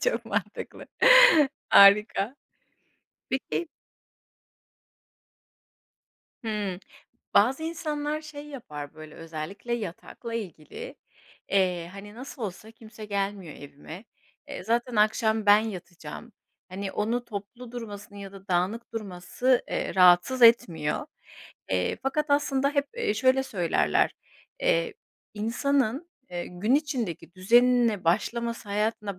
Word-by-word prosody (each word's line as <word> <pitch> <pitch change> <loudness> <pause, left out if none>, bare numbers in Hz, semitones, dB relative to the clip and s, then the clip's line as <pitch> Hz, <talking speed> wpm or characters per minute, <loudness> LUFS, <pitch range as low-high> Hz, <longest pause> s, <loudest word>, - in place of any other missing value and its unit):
Çok 485 - 0
mantıklı. - - -4 0.8
Harika. 205 +4 +6 0.9
Peki 290 +5 -2 2.8
Hımm. 205 -4 -3 0.6
Bazı 260 +9 +4
insanlar 305 -2 -3
şey 295 -1 -10
yapar 150 - -8
böyle, 155 -1 -12
özellikle 165 +8 -7
yatakla 230 +3 -7
ilgili, 215 - -7 0.5
eee, 180 -3 +1
hani, 205 +1 -10
nasıl 255 +1 -9
olsa 210 +2 -6
kimse 220 -1 -12
gelmiyor 200 -5 -3
evime, 145 +7 -11 0.4
eee, - - -7
zaten 235 +1 0
akşam 220 0 +2
ben 205 +1 +8
yatacağım, 185 0 -7 0.4
hani, 190 +1 -5
onun 225 +4 -1
toplu 235 +2 -9
durmasını 205 -4 -8
ya 195 -1 -9
da 195 0 -14
dağınık 190 +8 -1
durması, 215 +5 -1
eee, - - -3
rahatsız 180 +7 +5
etmiyor. 170 -10 +4 0.6
Eee, 90 -1 0
fakat 290 +3 -1
aslında 280 -1 +2
hep, 285 -1 0
eee, 475 - 0
şöyle 260 +3 +3
söylerler, 165 - +1 0.5
eee, 165 0 +1 0.4
insanın, 270 +6 0 0.2
eee, 175 0 -4
gün 210 +8 0
içindeki 245 - -2
düzenine 235 0 +3
başlaması, 230 +5 -1
hayatına 210 -2 -2
215 Hz, 105 wpm, -27 LUFS, 185-250 Hz, 2.8 s, ben